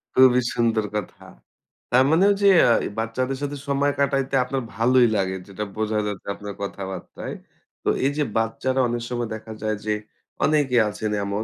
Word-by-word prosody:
খুবই 130 -1 +6
সুন্দর 115 -2 +1
কথা। 105 -4 -5 0.7
তার 130 +2 +6
মানে 170 +5 +5 0.2
যে 200 - +5 0.2
আ - - +6 0.3
বাচ্চাদের 130 +4 -2
সাথে 145 0 -3
সময় 140 +1 +2
কাটাইতে 135 -1 +1
আপনার 135 +1 -2
ভালোই 120 +3 +4
লাগে। 95 0 0
যেটা 100 +1 -5
বোঝা 110 0 0
যাচ্ছে 105 -2 -6
আপনার 100 0 -7
কথাবার্তায়। 95 -1 -6 0.5
তো - - +1 0.2
এই 140 - +3
যে 150 - +2
বাচ্চারা 115 +4 0
অনেক 120 0 -2
সময় 120 -2 -2
দেখা 110 0 -9
যায় 110 -1 0
যে 105 - +1 0.5
অনেকেই 140 -6 +3
আছেন 110 +1 -3 0.2
এমন 100 +2 -2
120 Hz, 165 wpm, -23 LUFS, 110-135 Hz, 0.7 s, খুবই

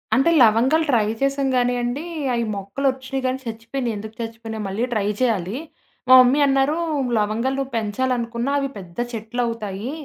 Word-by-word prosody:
అంటే, 270 +7 +4
లవంగాలు 255 +9 +4
ట్రై 225 -4 +3 0.2
చేసాం 275 0 +1
కానియండి. 245 +2 0 0.3
అయి 235 - 0
మొక్కలొచ్చినయి 260 +6 -2
గానీ 255 +1 0
చచ్చిపోయినయి. 230 +2 -4
ఎందుకు 220 +1 -8
చచ్చిపోయినయో, 225 -1 -6
మళ్ళీ 200 +5 -2
ట్రై 205 -2 0
చేయాలి. 215 -2 0 0.5
మా 255 - +7
మమ్మీ 255 +4 +4
అన్నారు 275 +2 +2 0.4
"లవంగాలు 220 +5 0
నువ్వు 270 0 -3
పెంచాలనుకున్నా 235 +3 -1
అవి 275 -1 -2
పెద్ద 180 -1 -11 0.2
చెట్లవుతాయి. 225 -1 -3
240 Hz, 135 wpm, -22 LUFS, 220-265 Hz, 0.5 s, మా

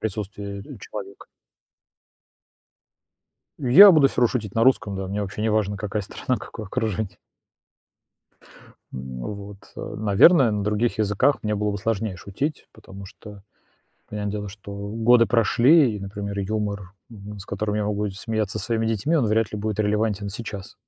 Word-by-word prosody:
присутствии 100 -1 -5 0.2
человека. 100 -1 -9 2.3
Я 150 +10 +9
буду 150 -4 +5
всё - - -3
равно 120 - +5
шутить 105 -6 -3
на 115 - +3
русском, 105 -6 +2
да. 95 0 -4
Мне 100 +2 -3
вообще 100 +1 -4
не 110 - +1
важно 105 -1 0
какая 105 +1 -3
страна, 125 +6 -3
какое 110 - -9
окружение. 110 -4 -3 1.7
М, 65 -1 -7
вот. 100 +7 -7 0.2
Э, - - -6
наверное, 110 - +5
на 105 -1 -1
других 105 +3 0
языках 110 +6 +1
мне 105 0 -1
было 105 0 -1
бы 100 - -3
сложнее 110 -1 -2
шутить, 130 - -4
потому 100 -2 -12
что 105 -1 -13 0.7
понятное 105 -1 -4
дело, 105 -1 -4
что 100 0 -10
годы 115 +4 +3
прошли 120 +2 +4
и, - - -8
например, 100 +1 -5
юмор, 100 -1 -3 0.2
м, 105 -2 -10
с 95 - -9
которым 105 +2 -3
я 105 - 0
могу 105 0 -1
смеяться 110 +1 -3
со - - -3
своими 115 -1 0
детьми, 115 +9 0
он 135 -7 +2
вряд 110 0 +1
ли 105 - -4
будет 110 0 -2
релевантен 105 -1 0
сейчас. 105 -2 -7
105 Hz, 160 wpm, -23 LUFS, 100-115 Hz, 2.3 s, Я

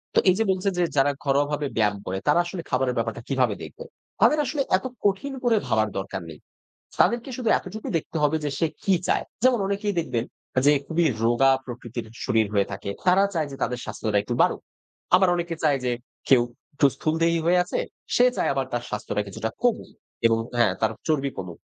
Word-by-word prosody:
তো - - +7
এই 185 - +5
যে, - - +4
বলছে 190 +1 0
যে, 180 - +3
যারা 140 +1 +4
ঘরোয়াভাবে 145 +1 +1
ব্যায়াম 105 -2 +2
করে, 95 - -2
তারা 150 +4 +5
আসলে 175 0 -5
খাবারের 130 -1 +1
ব্যাপারটা 115 0 -2
কিভাবে 125 -6 +1
দেখবে? - - -9 0.4
তাদের 300 - +5
আসলে 280 +2 -1 0.2
এত 190 - -10 0.2
কঠিন 205 +8 +1
করে 240 -2 +4
ভাবার 110 -2 +2
দরকার 95 0 -4
নেই। 80 - -10 0.6
তাদেরকে 235 +6 +3
শুধু 240 -3 -1
এতটুকুই 220 +1 -7
দেখতে 160 +1 -5
হবে 150 +2 +3
যে, 145 - 0
সে 165 - +3 0.2
কি 195 - +3
চায়। - - +1 0.2
যেমন 255 -2 +4
অনেকেই 200 +1 -1
দেখবেন 120 -8 -1 0.4
যে, 145 - +7
খুবই 165 +3 +1 0.2
রোগা 120 +4 +4
প্রকৃতির 120 -2 -6 0.2
শরীর 110 -1 +3
হয়ে 100 -1 +2
থাকে। 100 0 -5 0.2
তারা 185 +2 +6
চায় 160 -4 0
যে, - - -6
তাদের 125 -1 -2
স্বাস্থ্যটা 105 -1 -1
একটু 120 - -3
বাড়ুক। - - +2 0.5
আবার 190 +1 +4
অনেকে 170 -1 -2
চায় 145 -3 +3
যে, 125 - +1 0.4
কেউ 130 -3 +7 0.3
একটু 140 - +2
স্থূলদেহী 165 +1 +1
হয়ে 180 +1 +4
আছে, 180 - -3 0.4
সে 245 - +6
চায় - - +1
আবার 135 -1 -1
তার 120 0 -1
স্বাস্থ্যটা 105 0 -2
কিছুটা 105 +3 -4
কমুক 245 -2 0 0.3
এবং 115 0 +2 0.2
হ্যাঁ, 115 -6 +4
তার 110 - +2 0.2
চর্বি 140 -4 +1
কমুক। 90 -3 -7
145 Hz, 195 wpm, -25 LUFS, 115-180 Hz, 0.6 s, তো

